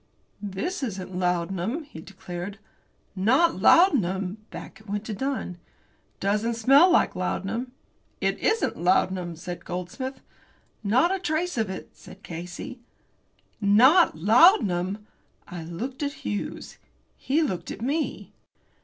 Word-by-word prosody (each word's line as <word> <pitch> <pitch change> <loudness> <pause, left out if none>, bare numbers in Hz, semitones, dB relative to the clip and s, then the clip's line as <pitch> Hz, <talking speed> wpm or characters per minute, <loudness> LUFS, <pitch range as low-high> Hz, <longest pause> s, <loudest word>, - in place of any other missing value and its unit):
"This 210 - -4
isn't 190 -7 -5
laudanum," 180 - -1
he 220 - -11
declared. 190 +1 -7 0.6
"Not 265 - +3
laudanum!" 200 - +4
Back 195 - -9
it 215 - -17
went 205 +1 -3
to 220 - -4
Dunn. 255 -7 -3 0.6
"It - - -41
doesn't 210 +4 0
smell 275 +10 +6
like 360 - +3
laudanum." 225 +7 -3 0.5
"It - - 0
isn't 445 +1 0
laudanum," 180 -1 +1
said 175 +1 -7
Goldsmith. 185 +10 -5 0.6
"Not 255 - +3
a 385 - -1
trace 350 +1 -1
of 220 -4 0
it," 190 - -7
said 195 - -14
Casey. 175 +8 -7 0.8
NOT 250 - +5
laudanum! 205 - +4 0.4
I 175 -1 -7
looked 230 - -6
at 285 0 -4
Hughes. 205 - -5 0.4
He 300 +5 0
looked 180 - -3
at 220 - -6
me. 295 +5 -2
205 Hz, 125 wpm, -26 LUFS, 180-270 Hz, 0.8 s, smell